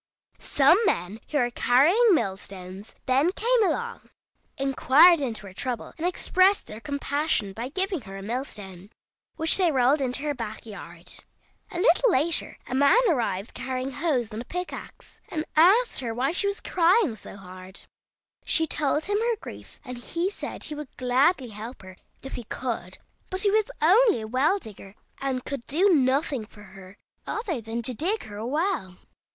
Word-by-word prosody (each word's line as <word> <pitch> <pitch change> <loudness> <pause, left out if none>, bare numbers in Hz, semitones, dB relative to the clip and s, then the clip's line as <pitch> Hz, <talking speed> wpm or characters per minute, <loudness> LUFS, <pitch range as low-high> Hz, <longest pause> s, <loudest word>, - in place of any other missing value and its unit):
Some 290 +7 +4
men 180 +6 -1
who 300 - -1
were 245 -3 +1
carrying 345 - +4
mill 195 -9 0
stones 190 +1 -10
then 275 +6 +3
came 475 +1 +2
along, 470 +6 -2 0.5
inquired 275 +5 +5
into 225 -6 -3
her 190 - -10
trouble, 245 +3 -4
and 335 +2 -2
expressed 370 +2 +2
their 215 - -9
compassion 285 -5 -1
by 235 +5 -5
giving 375 +1 -1
her 195 -2 -9
a 195 - -8
mill 240 +6 -2
stone, 195 -6 -10 0.5
which 320 0 +3
they 360 -4 +3
rolled 270 +2 +3
into 260 +1 -2
her 295 -1 -1
back 225 -4 -7
yard. 175 -5 -10 0.5
A 365 - -7
little 485 +4 +4
later 315 +4 +1
a - - -7
man 280 - +5
arrived 225 - -1
carrying 260 +1 -4
hoes 255 -6 -1
and 225 +3 -6
pickax, 360 +1 -7
and 310 -1 -3
asked 390 +10 +5
her 235 -4 -4
why 260 +4 0
she 390 +4 0
was 400 0 -3
crying 350 - +3
so 210 - -11
hard. 185 -1 -10 0.6
She 325 - +2
told 300 0 0
him 410 +1 0
her 465 +1 +1
grief, - - -11
and 250 -1 -7
he 345 +9 -2
said - - -6
he 305 - -3
would 300 -2 -9
gladly 255 +2 +2
help 220 +2 -9
her 185 0 -11 0.3
if 270 - -8
he 245 - -5
could, 220 -7 -4 0.3
but 375 0 -1
he 405 -1 +3
was 435 +2 +2
only 405 - +5
a 220 - -6
well 270 - +2
digger, 205 - -12 0.2
and 265 -2 -3
could 280 -4 -4
do 360 +8 +3
nothing 265 -4 +1
for 210 - -15
her 190 0 -14 0.3
other 395 - -3
than 225 +2 -5
to 255 - +1
dig 370 - -1
her 205 -1 -9
a 220 +2 -4
well. 295 - -1
270 Hz, 175 wpm, -26 LUFS, 220-345 Hz, 0.6 s, inquired